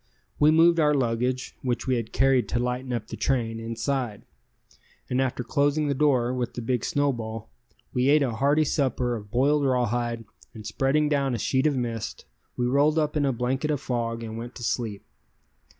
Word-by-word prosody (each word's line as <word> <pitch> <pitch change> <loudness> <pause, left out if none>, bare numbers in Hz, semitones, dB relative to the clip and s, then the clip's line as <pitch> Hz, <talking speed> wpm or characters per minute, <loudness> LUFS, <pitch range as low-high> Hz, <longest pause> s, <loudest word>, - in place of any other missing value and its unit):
We 150 - +6
moved 165 +2 +5
our 150 -1 +4
luggage 125 0 -1
(which 125 -2 -2
we 130 - +1
had 115 -2 -4
carried 135 -2 +2
to - - 0
lighten 125 +1 -2
up 115 -3 -2
the - - -7
train) 115 -4 -1
inside, 115 0 -3 0.9
and 125 +1 +2
after 130 -1 -1
closing 145 +4 +1
the - - +2
door 130 -4 +2
with 125 -2 -3
the 120 - -4
big 120 0 -1
snowball, 115 - -2 0.4
we 125 +2 +2
ate 150 0 +5
a 130 - 0
hearty 140 +7 +2
supper 125 -4 0
of 105 -2 -8
boiled 140 +6 +2
rawhide, 120 -3 0 0.3
and 110 -1 -9
spreading 135 +7 +1
down 140 -3 +1
a - - -2
sheet 130 +6 +1
of 145 - +1
mist, 115 -3 -4 0.3
we 125 - 0
rolled 145 +5 +3
up 150 -1 0
in 145 -2 +2
a 135 - +2
blanket 130 +4 -1
of 150 -2 0
fog 115 -3 -3
and 110 0 -6
went 120 +1 -8
to 120 - -8
sleep. 110 -3 -2
125 Hz, 190 wpm, -26 LUFS, 115-140 Hz, 0.9 s, We